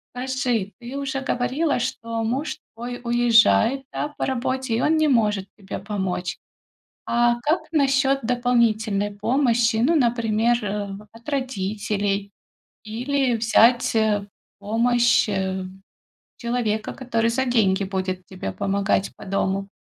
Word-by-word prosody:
Скажи, 250 -5 -1
ты 245 +3 -7
уже 270 -1 -3
говорила, 270 +3 0
что 230 -1 -3
муж 260 +7 -2 0.2
твой 245 +2 -6
уезжает, 235 - +4
да, 295 - -3
по - - -1
работе, 260 -1 -1
и 230 - 0
он 315 +1 +3
не 310 0 +3
может 210 -7 +2
тебе 195 -2 -6
помочь. 190 -3 -3 0.7
А 240 0 +3
как 305 +7 +1
насчёт 275 -2 +2
дополнительной 225 -4 +1
помощи? 235 +1 +2
Ну, 250 +9 +3
например, 235 -2 +2
э, 205 0 -3 0.2
от 230 +4 -17
родителей, 205 -6 -2 0.5
или 250 +3 0
взять, 230 +2 +4
э, 210 -2 +2 0.3
помощь, 235 +3 +2
э, 190 -2 -2 0.7
человека, 235 -3 -2
который 230 -3 0
за 260 +3 0
деньги 205 -6 +2
будет 185 -1 -3
тебе 185 - -6
помогать 195 - 0
по - - -11
дому? 195 0 -1
230 Hz, 125 wpm, -23 LUFS, 205-250 Hz, 0.7 s, уезжает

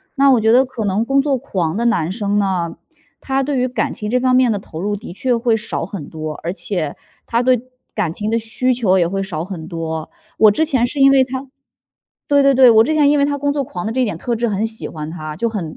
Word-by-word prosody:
那 275 -1 +5
我 245 - +4
觉 220 0 +3
得 250 +3 +6
可 245 -5 -5
能 200 +3 +1
工 270 +3 +1
作 280 -1 0
狂 185 - -2
的 235 +3 -1
男 175 -9 +1
生 205 0 -1
呢， 185 -4 -1 0.4
他 270 0 -1
对 280 -1 -1
于 255 - +1
感 250 - -2
情 210 0 -5
这 250 - +2
方 255 0 +2
面 255 -1 +4
的 210 - +1
投 165 -4 -8
入 205 +1 -1
的 205 -3 -9
确 245 +6 0
会 230 -1 +1
少 215 - -3
很 185 -6 -8
多， 155 -1 -5
而 170 - -2
且 175 -7 -3 0.3
他 235 +1 0
对 250 -2 +3 0.3
感 180 -7 -1
情 210 +4 -3
的 230 - +1
需 250 +3 0
求 200 -6 +2
也 175 - +3
会 195 +3 -2
少 165 -5 -4
很 175 -4 -7
多。 160 -2 -5 0.3
我 215 - +7
之 315 +10 +1
前 260 -6 +2
是 280 +3 -4
因 275 0 +7
为 265 -1 +5
他 260 +1 -5 0.8
对 285 -1 +4
对 275 - +5
对， 255 -2 +7
我 220 0 +6
之 310 - 0
前 290 -2 +4
因 295 - +3
为 280 - +3
他 285 0 0
工 285 0 -1
作 285 -1 -1
狂 180 -6 -6
的 220 - -2
这 260 - -1
一 - - +3
点 210 -8 -3
特 235 +7 -2
质 235 +1 0
很 205 +1 -1
喜 225 0 -2
欢 155 0 -7
他， 155 -3 -6
就 230 +5 0
很 180 -8 -5
225 Hz, 285 characters per minute, -18 LUFS, 185-255 Hz, 0.8 s, 我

